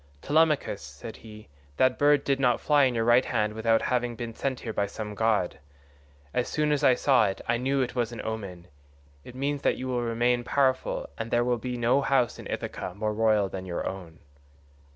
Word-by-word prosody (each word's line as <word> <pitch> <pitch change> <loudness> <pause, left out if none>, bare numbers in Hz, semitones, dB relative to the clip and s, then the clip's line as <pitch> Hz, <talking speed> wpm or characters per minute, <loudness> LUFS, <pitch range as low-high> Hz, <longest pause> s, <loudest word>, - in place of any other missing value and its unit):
"Telemachus," 155 -8 +2
said 70 +11 -10
he, 110 -1 -13 0.3
"that 130 -1 +2
bird 145 -1 +4
did 135 -1 0
not 125 -3 +2
fly 145 -3 +4
on 125 - -2
your 115 - +1
right 120 +2 +4
hand 105 0 0
without 115 +1 +1
having 120 -1 -1
been 115 -1 -6
sent 130 +2 -3
there 110 - -4
by 100 -1 0
some 105 +1 -6
god. 105 -6 0 0.7
As 125 - 0
soon 150 0 0
as 150 0 0
I 130 -3 +6
saw 130 -5 +3
it 95 - -4
I 115 - +2
knew 135 +3 0
it 125 - -4
was 120 -2 -1
an 120 - -8
omen; 100 -6 -5 0.6
it 125 - -12
means 140 +2 -2
that - - +1
you 130 - -5
will 125 -1 -1
remain 120 +1 +1
powerful 130 0 0
and 115 0 -3
that - - 0
there 120 - +3
will 120 -1 0
be 125 +1 -4
no 120 +4 +2
house 130 -3 +1
in - - -8
Ithaca 90 - -4
more 105 +1 -2
royal 110 -2 +2
than 95 -1 -7
your 85 - -3
own." 90 -4 -7
120 Hz, 215 wpm, -27 LUFS, 110-130 Hz, 0.7 s, I